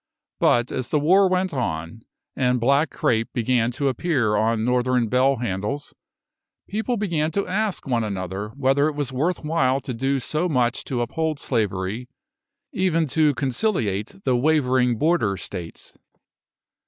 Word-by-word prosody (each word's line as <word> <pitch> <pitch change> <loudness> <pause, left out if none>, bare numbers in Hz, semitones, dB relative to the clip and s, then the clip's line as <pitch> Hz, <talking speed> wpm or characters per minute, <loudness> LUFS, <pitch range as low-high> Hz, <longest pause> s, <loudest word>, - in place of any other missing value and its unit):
But 120 0 +3
as 130 - -3
the 150 - +2
war 185 +6 +4
went 185 -1 0
on, 85 - -3 0.3
and 125 -1 +1
black 140 +5 +3
crape 115 -2 0
began 120 -1 +1
to 140 +2 -1
appear 130 -5 +1
on 110 +1 +1
Northern 125 -1 +1
bell 130 +3 +3
handles, 120 +4 -3 0.7
people 220 +4 -2
began 170 -7 0
to 200 - 0
ask 205 +1 -1
one 120 -4 0
another 95 0 -4
whether 140 +1 +2
it 155 - -3
was 145 -3 -3
worth 160 +8 -1
while 140 -4 +1
to 130 - -5
do 135 +4 0
so 155 +7 -1
much 125 -5 0
to 125 -3 -2
uphold 155 +5 -1
slavery, 105 -1 -2 0.6
even 165 -3 +1
to 150 -1 +2
conciliate 125 - -1
the 130 - +2
wavering 130 -3 +2
Border 120 - +1
States. 90 -4 -8
130 Hz, 145 wpm, -23 LUFS, 115-155 Hz, 0.7 s, war